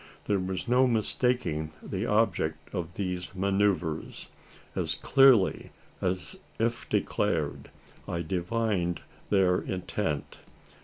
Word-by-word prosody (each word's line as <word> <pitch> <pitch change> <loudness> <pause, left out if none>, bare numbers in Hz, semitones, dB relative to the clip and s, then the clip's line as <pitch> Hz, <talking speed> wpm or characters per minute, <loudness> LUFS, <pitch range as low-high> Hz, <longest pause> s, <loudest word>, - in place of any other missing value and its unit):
There 100 -1 +1
was 95 0 -3
no 125 +2 +4
mistaking 110 -9 +1
the - - -3
object 80 -8 0
of 85 -2 -4
these 90 -2 -3
manoeuvres. 95 -4 0 0.5
As - - -1
clearly 130 -8 +4 0.3
as 90 0 -2 0.2
if 115 +1 -1
declared. - - 0 0.4
I 85 -1 -2
divined 90 0 -1 0.3
their 95 -3 +4
intent. 90 -4 -3
95 Hz, 100 wpm, -28 LUFS, 85-110 Hz, 0.5 s, no